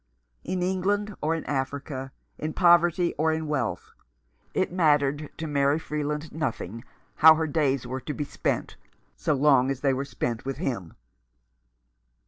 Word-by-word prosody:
In 180 -1 -2
England 200 +3 0
or 160 +2 +1
in 165 - -5
Africa, 135 -1 -3 0.3
in 155 0 -3
poverty 175 0 +4
or 160 +1 +3
in 160 0 -2
wealth, 135 -7 -2 0.6
it 185 -2 0
mattered 150 -4 +2
to 160 - -4
Mary 140 -1 +2
Freeland 150 0 -3
nothing 115 - -4 0.3
how 160 0 +9
her 160 0 0
days 140 -4 0
were 130 +2 -4
to 150 - -4
be 150 - -2
spent, - - -3 0.4
so 150 - 0
long 135 -2 +4
as 135 -1 -3
they 135 -2 +2
were 135 +1 -1
spent 120 -4 -3
with 135 0 -4
him. 120 - -4
150 Hz, 150 wpm, -26 LUFS, 135-160 Hz, 0.6 s, how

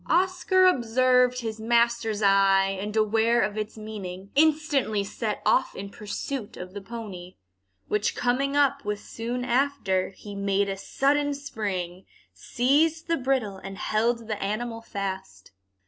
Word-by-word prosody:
Oscar 370 +2 +3
observed 250 -4 +3
his 220 -1 -5
master's 235 -1 +1
eye, 195 -1 +4
and 210 +1 -5
aware 225 +2 +3
of 210 - -1
its 215 +1 -4
meaning, 195 -3 -7
instantly 290 -8 +2
set 210 +1 -4
off 260 - +2
in 200 +1 -7
pursuit 215 +3 -5
of 180 +1 -8
the 205 - -6
pony, 195 -4 -8 0.5
which 210 0 0
coming 270 +3 0
up 280 -1 +2
with 210 -1 -2
soon 240 +4 -4
after, 245 -7 +1
he 205 +1 -11
made 200 0 0
a 195 - -2
sudden 285 +7 0
spring, 195 -9 -4 0.3
seized 305 +6 +1
the 335 - +2
bridle, 255 -8 -1
and 195 0 -8
held 230 +2 0
the 215 -2 -3
animal 225 +3 -3
fast. 195 - -6
225 Hz, 140 wpm, -26 LUFS, 200-260 Hz, 0.5 s, eye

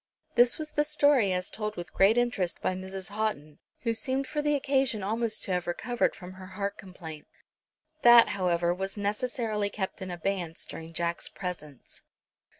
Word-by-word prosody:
This 240 0 +5
was 310 -1 -5
the 295 - +2
story 285 -8 +4
as 180 0 -2
told 215 -1 -3
with 175 -1 -7
great 200 +4 +5
interest 240 -8 0
by - - 0
Mrs. 190 0 -6
Houghton, 200 -8 -3 0.2
who 230 -1 0
seemed 260 +4 0
for 295 +3 -2
the 295 0 +2
occasion 270 -6 +1
almost 220 +2 0
to - - -2
have 180 -1 0
recovered 240 +7 0
from 180 0 -9
her 185 0 -10
heart 200 0 -1
complaint. 165 -5 -10 0.7
That, 240 -1 +8
however, 175 -2 +1
was 195 +3 -4
necessarily 210 0 -1
kept 195 0 -4
in 190 - -4
abeyance 175 -1 -3
during 165 0 -8
Jack's 170 +1 -1
presence. 155 -7 -7
200 Hz, 165 wpm, -29 LUFS, 180-240 Hz, 0.7 s, That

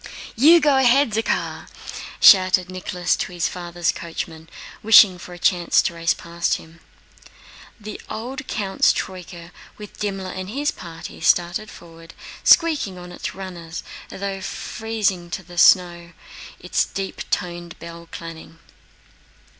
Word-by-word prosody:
"You 315 +9 +7
go 290 -3 +3
ahead, 265 0 +4
Zakhár!" 225 +2 -2 0.5
shouted 185 -1 +6
Nicholas 180 -1 -1
to - - -4
his 175 -1 -1
father's 175 -1 -2
coachman, 165 -1 -7 0.3
wishing 210 -4 +7
for 180 - -11
a - - -11
chance 175 -1 +2
to - - -1
race 165 0 0
past 170 0 -2
him. 160 +1 -12 1.0
The 210 0 -8
old 255 +6 -6
count's 195 -4 +1
troyka, 175 -2 -7 0.3
with 210 -1 -12
Dimmler 195 -3 -3
and 185 0 -6
his 285 +6 -1
party, 165 -3 -10
started 175 +5 +1
forward, 165 -1 -14 0.3
squeaking 300 - +4
on 180 0 -10
its 175 - -6
runners 175 -4 -7 0.3
as - - -10
though 195 -1 -3
freezing 205 -6 -3
to 190 +2 -5
the 175 0 -6
snow, 175 -2 +4 0.5
its 180 - 0
deep 195 -1 -5
toned 175 -1 -3
bell 170 0 -11
clanging. 165 -1 -9
180 Hz, 135 wpm, -22 LUFS, 170-210 Hz, 1.0 s, You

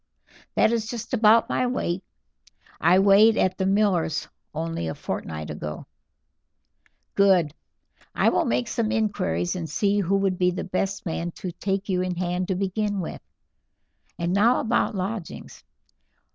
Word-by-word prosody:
"That - - +4
is 225 -2 -1
just 235 0 -6
about 225 -1 +5
my 250 - 0
weight; 190 -7 -2 0.8
I 180 +2 +5
weighed 200 +3 +6
at 185 +1 +1
the 190 - +1
miller's 195 -6 +1 0.2
only 160 - -3
a 80 - -4
fortnight 80 -1 -5
ago." 75 0 -6 1.3
"Good. 185 -7 +4 0.6
I - - +4
will - - +1
make 120 +1 0
some 225 -2 -1
inquiries, 90 - 0
and 165 -3 -4
see 205 0 +1
who 195 0 +1
would 195 -2 0
be 180 -1 +4
the 180 - -3
best 190 +1 -2
man 170 0 -2
to 185 - -6
take 195 +3 -3
you 185 -2 0
in 185 -1 -2
hand 180 +1 -2
to 190 - 0
begin 200 +2 -1
with. 170 - -5 1.0
And 170 +1 -1
now 225 +5 +4
about 230 -2 0
lodgings. 195 -1 -5
190 Hz, 150 wpm, -25 LUFS, 175-210 Hz, 1.3 s, weighed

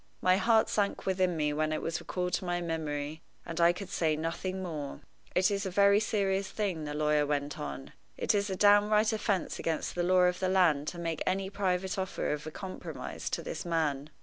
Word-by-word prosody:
My 185 0 +4
heart 225 +1 +4
sank 205 -1 -1
within 185 -2 +1
me 150 -1 +1
when 155 +1 0
it 155 - -1
was 165 +1 -2
recalled 180 -1 -3
to 190 - 0
my 175 0 0
memory, 155 -2 -3 0.2
and 165 +1 -3
I 170 +1 +7
could 180 +2 -7
say 160 -5 +1
nothing 185 +4 -3
more. 150 -6 -5 0.3
"It 185 +2 +4
is 200 0 -1
a 190 - -2
very 200 +2 +5
serious 195 -3 0
thing," 185 -7 -2
the 150 0 -4
lawyer 150 0 +2
went 145 0 -2
on 140 -2 -6 0.2
"it - - +1
is 205 0 +1
a 190 - -1
downright 210 +2 +5
offense 200 -4 -1
against 160 -2 -2
the 175 - -1
law 180 +1 +4
of 180 0 +2
the 185 - 0
land 165 -6 +3
to 175 - -4
make 165 -1 -3
any 190 +1 0
private 190 -1 -1
offer 190 0 -2
of 150 +1 -5
a - - -5
compromise 190 +3 -6
to - - -3
this - - -5
man. 155 -5 -1
180 Hz, 210 wpm, -30 LUFS, 155-195 Hz, 0.3 s, I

